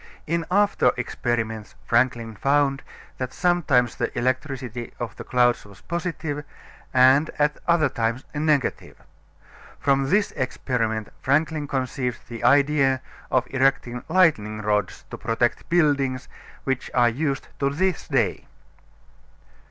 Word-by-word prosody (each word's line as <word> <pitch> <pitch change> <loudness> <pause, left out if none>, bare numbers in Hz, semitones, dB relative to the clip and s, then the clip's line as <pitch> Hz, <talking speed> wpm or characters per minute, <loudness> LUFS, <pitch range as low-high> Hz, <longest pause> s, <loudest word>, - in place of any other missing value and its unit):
In 165 0 -1
after 200 -9 +3
experiments 115 -3 -3
Franklin 115 -2 +1
found 140 +3 +2 0.4
that 130 -1 -3
sometimes 155 -9 +2
the - - -1
electricity 130 -2 -2
of 120 -2 -5
the - - -8
clouds 120 -1 +2
was 100 0 -16
positive 165 -4 -4 0.5
and 130 +4 +5
at 150 0 +1
other 170 -3 +4
times 120 -1 -2
negative. 150 -2 0 0.8
From 135 -1 +2
this 205 +3 +2
experiment 120 -4 -2
Franklin 150 +2 +1
conceived 130 -2 -3
the 120 -1 -7
idea 140 0 +4 0.3
of 130 -1 +2
erecting 130 -2 +1
lightning 110 - +2
rods 105 -2 -1
to - - -7
protect 115 +1 -1
buildings, 140 -6 +2 0.4
which 135 -1 -2
are 120 -1 +5
used 140 +3 -2
to 140 - +2
this 180 +5 -1
day. - - 0
130 Hz, 120 wpm, -24 LUFS, 120-150 Hz, 0.8 s, and